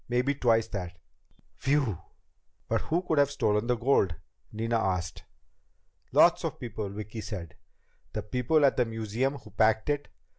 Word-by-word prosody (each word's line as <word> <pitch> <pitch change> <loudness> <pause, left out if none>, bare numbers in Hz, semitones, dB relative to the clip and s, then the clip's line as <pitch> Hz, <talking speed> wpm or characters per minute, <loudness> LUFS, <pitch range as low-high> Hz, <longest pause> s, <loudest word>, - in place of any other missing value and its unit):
Maybe 125 +3 +2
twice 115 -5 +2
that." 90 -3 -5 0.6
"Whew!" 135 - +1 0.7
"But - - +1
who 170 +3 -1
could 160 -4 +1
have 140 -1 +4
stolen 110 -5 0
the 125 - +2
gold?" 115 -8 +2 0.4
Nina 115 +1 0
asked. 90 -4 -2 0.9
"Lots - - +5
of - - -3
people," 110 -4 -5
Vicki 105 +2 -6
said. 95 -6 -7 0.6
"The - - -3
people 130 +6 +2
at 135 - +3
the 125 - +3
museum 115 +4 -2
who 140 - -12
packed 110 +4 +2
it. 145 0 -2
115 Hz, 150 wpm, -29 LUFS, 105-135 Hz, 0.9 s, Lots